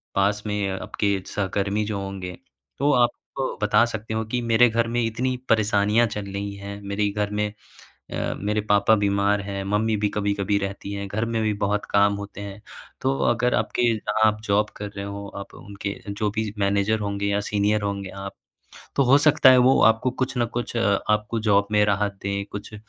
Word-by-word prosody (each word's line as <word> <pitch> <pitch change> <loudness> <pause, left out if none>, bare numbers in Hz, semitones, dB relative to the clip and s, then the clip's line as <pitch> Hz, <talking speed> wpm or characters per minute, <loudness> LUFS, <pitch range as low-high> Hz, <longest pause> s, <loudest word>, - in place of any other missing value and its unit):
पास 100 +1 +1
में 105 -1 -1
आपके 100 +1 -1 0.2
सहकर्मी 100 +1 0
जो 105 -2 -3
होंगे। 95 -2 -6 0.4
तो 145 +2 +3
आप 120 - +4 0.5
बता 105 +1 +4
सकते 110 -1 -5
हो 110 0 -1
कि 125 - 0
मेरे 120 +1 +4
घर 115 +1 +1
में 120 +1 0
इतनी 125 +3 -1
परेशानियाँ 110 +1 +3
चल 105 -1 -5
रही 100 +1 -4
हैं। 100 0 -8
मेरे 100 +1 -1
घर 105 0 -1
में 105 - +1 0.7
अ, - - -2
मेरे 105 +1 0
पापा 105 +1 +3
बीमार 100 0 +1
हैं, 100 0 -4
मम्मी 105 +2 +1
भी 105 - +3
कभी-कभी 100 -1 0
रहती 100 0 -5
हैं, 100 0 -4
घर 110 +3 -1
में 115 -1 -1
भी 110 -1 +1
बहुत 105 +1 0
काम 100 0 +4
होते 100 0 -8
हैं। 100 0 -7 0.4
तो 135 +1 +1
अगर 120 +1 +1
आपके - - 0
जहाँ 110 0 +1
आप 110 0 +1
जॉब 105 0 +2
कर 105 - -5
रहे 100 - -4
हो, 100 0 -6
आप 100 - -8
उनके 100 0 -6
जो 100 +1 -1
भी 110 -2 -2
मैनेजर 100 +2 +1
होंगे 100 -1 -2
या 100 0 +1
सीनियर 105 +1 0
होंगे 100 -1 -3
आप। 100 0 -6 0.6
तो 140 - +4
हो 135 +2 +6
सकता 150 -2 +6
है। 130 - +7
वो 125 +2 +5
आपको 115 +3 +3
कुछ 130 +1 -2
न 120 - +2
कुछ 120 0 -3
अ, 100 -4 +2
आपको 105 +2 +1
जॉब 100 0 +4
में 105 0 +4
राहत 100 -1 0
दें, 100 0 -2
कुछ 105 +2 -7
105 Hz, 195 wpm, -24 LUFS, 100-110 Hz, 0.7 s, है